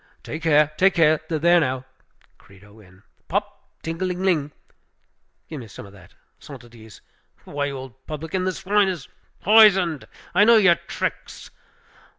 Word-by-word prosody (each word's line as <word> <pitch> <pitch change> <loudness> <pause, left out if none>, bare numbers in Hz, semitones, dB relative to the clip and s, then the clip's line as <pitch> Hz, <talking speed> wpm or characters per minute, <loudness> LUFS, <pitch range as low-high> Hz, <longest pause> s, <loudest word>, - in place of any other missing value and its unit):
"Take 155 - -7
care! 150 -2 +3
take 195 0 +3
care! 155 -2 +3
There, 170 +2 +3
now 130 -4 -2 0.5
Credo 100 +2 -19
in 95 -1 -20 0.2
Pop! - - -4
ting 165 +2 -5
a - - 0
ling 180 0 -4
ling! 155 -6 0 1.0
give 155 - -8
me 120 - -10
some 105 - -11
of 100 - -15
that. 90 -3 -18 0.2
Cent - - -12
é 120 - -16
dize! 110 -3 -15 0.4
Why, 145 0 -4
you 140 -1 -5
old 130 0 -12
publican, 160 +4 -4
this 185 0 -4
wine 205 +1 +3
is 175 -7 -5 0.3
poisoned, 195 -7 +4 0.3
I 205 - +5
know 230 +1 +6
your 195 -5 +5
tricks! - - -6
155 Hz, 160 wpm, -22 LUFS, 130-185 Hz, 1.0 s, know